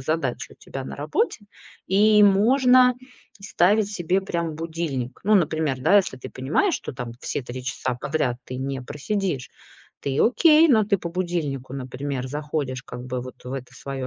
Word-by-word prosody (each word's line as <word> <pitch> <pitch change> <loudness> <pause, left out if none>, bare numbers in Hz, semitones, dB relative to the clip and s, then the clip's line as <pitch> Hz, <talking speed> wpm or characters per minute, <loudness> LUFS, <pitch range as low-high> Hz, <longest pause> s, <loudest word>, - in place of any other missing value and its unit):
задачи 130 -4 -2
у - - -15
тебя 135 - -8
на - - -7
работе. 225 - -1 0.5
И 210 +2 +5
можно 250 +5 +5 0.5
ставить 200 +2 +2
себе 185 0 0
прям 170 -4 -3
будильник. 160 -6 -4
Ну, 215 +1 +4
например, 155 -7 +1
да, 200 +10 +5
если 190 -9 +2
ты 130 - -9
понимаешь, 150 - 0
что - - -5
там 125 -2 -6
все - - -3
3 125 +1 -7
часа 125 0 -2
подряд 140 -5 -1
ты 125 - -6
не 135 +1 -3
просидишь, 150 +1 -3 0.5
ты 135 -1 -2
окей, 315 +6 +5
но 220 -7 +5
ты 200 -2 +1
по 170 - -5
будильнику, 165 -8 -3
например, 130 0 -4
заходишь 145 -2 -3
как 125 -1 -8
бы 125 0 -3
вот 130 - -11
в 125 - -6
эту 125 -2 -7
свою 135 -1 -5
150 Hz, 170 wpm, -24 LUFS, 130-195 Hz, 0.5 s, И